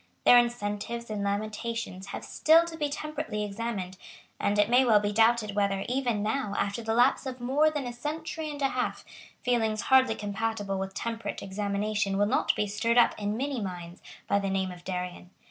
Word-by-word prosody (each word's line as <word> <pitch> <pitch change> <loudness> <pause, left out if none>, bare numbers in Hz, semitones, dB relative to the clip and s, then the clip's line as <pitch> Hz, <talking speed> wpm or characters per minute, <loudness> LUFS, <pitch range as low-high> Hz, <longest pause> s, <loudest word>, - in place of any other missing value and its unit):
Their 245 - +9
invectives 235 0 -2
and 205 -1 -2
lamentations 210 -1 -3
have - - -6
still 325 +2 +4
to 335 -1 -7
be 300 -2 -1
temperately 300 -7 -4
examined; 200 -3 -4 0.4
and 205 +1 +1
it 205 0 +4
may 250 +3 +5
well 225 -4 +5
be 205 0 -1
doubted 225 -1 +3
whether, 200 -1 0
even 245 -5 0
now, 215 -2 -1
after 200 +3 -1
the 225 0 -1
lapse 250 +3 +3
of 255 -1 -5
more 275 +6 +3
than 295 -3 -3
a 245 - -4
century 310 +4 -4
and 290 -1 -5
a 270 - +3
half, - - -3 0.4
feelings 225 -4 +1
hardly 265 0 +4
compatible 205 -1 -2
with 190 0 -5
temperate 230 0 -4
examination 200 0 -1
will 205 - +3
not 230 +6 +1
be 210 - 0
stirred 220 +4 0
up 240 - +6
in 210 +1 -2
many 270 -1 -2
minds 175 -3 -6 0.3
by 200 - +2
the 195 -1 -2
name 190 -1 -1
of 175 -1 -11
Darien. 180 -1 -5
220 Hz, 190 wpm, -28 LUFS, 200-245 Hz, 0.4 s, Their